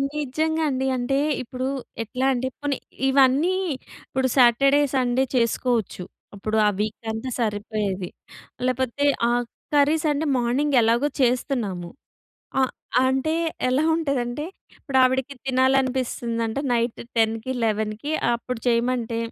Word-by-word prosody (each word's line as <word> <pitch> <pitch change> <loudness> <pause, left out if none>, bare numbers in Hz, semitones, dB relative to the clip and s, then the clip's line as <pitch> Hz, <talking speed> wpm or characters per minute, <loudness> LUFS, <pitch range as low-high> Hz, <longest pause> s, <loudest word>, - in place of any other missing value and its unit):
నిజంగా 310 +3 -1
అండి. 265 -1 -1
అంటే 250 +2 0 0.2
ఇప్పుడు 255 +1 -4 0.4
ఎట్లా 250 +4 -3
అంటే 255 +1 -1
పోనీ 290 -2 -1 0.3
ఇవన్నీ 275 +6 +4 0.5
ఇప్పుడు 260 0 0
సాటర్డే, 275 +3 +5
సండే 255 0 +2
చేసుకోవచ్చు. 235 -4 0 0.3
ఇప్పుడు 215 +2 -2
ఆ - - +5
వీక్ 215 +2 -3
అంతా 220 +4 -4
సరిపోయేది. 205 -4 -2 0.6
లేకపోతే 255 +2 0 0.2
ఆ - - +2 0.4
కర్రీస్ 295 +2 +3
అంటే 295 +2 -1
మార్నింగ్ 260 +4 +1
ఎలాగో 235 +5 +3
చేస్తున్నాము. 240 -8 0 0.7
ఆహ్, 260 - +1 0.3
అంటే 265 +4 +1 0.3
ఎలా 260 +4 +2
ఉంటదంటే. 280 -3 -2 0.3
ఇప్పుడు 270 -3 0
ఆవిడకి 260 +2 0
తినాలనిపిస్తుందంట 255 -3 0
నైట్ 235 -1 0 0.2
10కి 225 +2 +1
11కి 215 +5 -1 0.2
అప్పుడు 235 0 -5
చేయమంటే, 235 -1 +1
255 Hz, 110 wpm, -24 LUFS, 230-270 Hz, 0.7 s, సాటర్డే